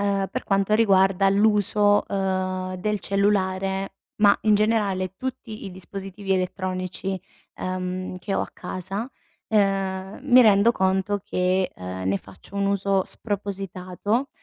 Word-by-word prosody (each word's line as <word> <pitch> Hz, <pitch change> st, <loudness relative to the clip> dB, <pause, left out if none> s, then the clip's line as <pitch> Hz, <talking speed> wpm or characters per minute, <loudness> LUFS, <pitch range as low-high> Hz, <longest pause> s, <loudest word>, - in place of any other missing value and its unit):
ehm, 200 Hz, -1 st, 0 dB
per 255 Hz, -, -4 dB
quanto 195 Hz, +1 st, +2 dB
riguarda 195 Hz, -3 st, +4 dB
l'uso, 205 Hz, 0 st, +3 dB
ehm, 185 Hz, -1 st, -2 dB
del 210 Hz, +2 st, -1 dB
cellulare. 195 Hz, -1 st, 0 dB, 0.3 s
Ma 200 Hz, -1 st, +7 dB
in 215 Hz, -1 st, +4 dB
generale 205 Hz, -4 st, +1 dB
tutti 255 Hz, -4 st, -6 dB
i 195 Hz, -, -6 dB
dispositivi 195 Hz, +1 st, -5 dB
elettronici, 185 Hz, 0 st, -2 dB, 0.3 s
ehm, 185 Hz, 0 st, -4 dB
che 195 Hz, +2 st, -3 dB
ho -, -, +1 dB
a -, -, -7 dB
casa. 195 Hz, +7 st, -5 dB, 0.4 s
Ehm, 195 Hz, -1 st, 0 dB
mi 255 Hz, -2 st, +6 dB
rendo 215 Hz, -1 st, +6 dB
conto 190 Hz, -1 st, +1 dB
che, 185 Hz, +1 st, 0 dB
uhm, 90 Hz, 0 st, -6 dB
ne 95 Hz, +1 st, +2 dB
faccio 100 Hz, -, -13 dB
un 200 Hz, 0 st, 0 dB
uso 195 Hz, -1 st, +1 dB
spropositato, 200 Hz, +3 st, -3 dB
195 Hz, 130 wpm, -24 LUFS, 185-205 Hz, 0.4 s, Ma